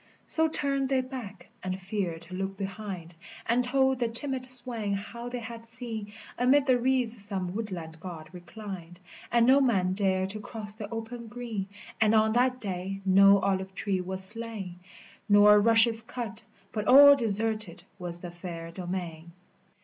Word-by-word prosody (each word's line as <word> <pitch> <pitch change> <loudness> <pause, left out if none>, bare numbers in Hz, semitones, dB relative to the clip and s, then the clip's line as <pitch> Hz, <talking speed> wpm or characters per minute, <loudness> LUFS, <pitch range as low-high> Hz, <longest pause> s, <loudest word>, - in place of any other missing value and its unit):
Mm 320 -1 +2
turner! 275 -2 0
they 265 -1 +2
back, 230 -8 -8
and 185 0 -3
feared 185 -4 -3
to 170 +2 -10
look 195 +1 -3
behind, 195 -3 -6 0.3
Ami 235 +2 +3
told 265 +1 +2
the 240 - +1
timid 260 +3 -1
swain 240 -5 -2
how 235 +4 -5
they 250 - -4
had 230 0 -8
seen 225 -3 -5 0.3
AmM 250 +3 +5
ilie 255 -3 +3
reeds 245 -4 +1
some 190 -3 -3
woodland 180 -7 -5
God 165 -3 -8
reclined, 180 -1 -9 0.3
A 240 - +2
ml 260 +4 +6
tin 270 - +3
man 185 -5 +1
dared 190 -1 0
to 215 - -6
cross 210 0 -7
the 215 -1 -7
open 230 +1 -6
green, 225 -4 -5 0.2
\ - - -17
Mil 215 - +5
mm 220 0 +4
tlmt 250 +1 +1
Hay 195 0 -4
no 195 +1 +7
olive 190 0 -1
tree 195 -3 -1
was 190 +1 -4
slain, 210 -4 -7 0.5
Hh| - - -3
tMftlie* 225 +2 +5
tut, 225 -3 -5 0.3
but 210 -1 -3
all 285 +2 +10
deserted 215 -6 -2 0.2
was 175 -1 -5
the 175 - -7
fair 170 -1 -7
domain. 175 -2 -6
210 Hz, 165 wpm, -28 LUFS, 185-235 Hz, 0.5 s, all